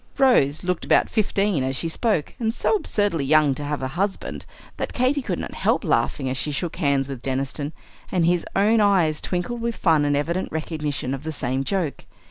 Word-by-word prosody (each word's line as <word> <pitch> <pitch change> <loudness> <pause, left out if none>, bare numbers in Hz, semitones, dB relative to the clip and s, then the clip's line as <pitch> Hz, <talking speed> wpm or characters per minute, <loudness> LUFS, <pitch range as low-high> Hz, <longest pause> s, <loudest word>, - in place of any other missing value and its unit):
Rose 160 - +4
looked 180 -1 -1
about - - +3
fifteen 205 - +1
as 130 +1 -1
she 165 - 0
spoke, 165 - 0
and 225 -2 +1
so - - +1
absurdly 205 - 0
young 150 0 +4
to 145 - -6
have 145 -1 -3
a 130 - -1
"husband," 190 +7 -3 0.3
that - - -3
Katy 260 +3 +1
could - - -3
not - - -5
help - - +1
laughing 135 -3 0
as 130 0 -1
she 150 - -1
shook 160 +4 -3
hands 140 -5 +1
with 135 -3 -6
"Deniston;" 135 +3 -2 0.4
and 175 -3 +2
his 175 0 +2
own 215 +3 +4
eyes 180 -7 +3
twinkled 195 +7 -3
with 235 0 -1
fun 160 -4 +3
and 145 0 +2
evident 170 +6 -1
recognition 150 -4 -3
of 135 - -4
the 160 +1 -4
same 135 -2 -2
joke. 175 -2 -2
160 Hz, 200 wpm, -23 LUFS, 140-200 Hz, 0.4 s, Rose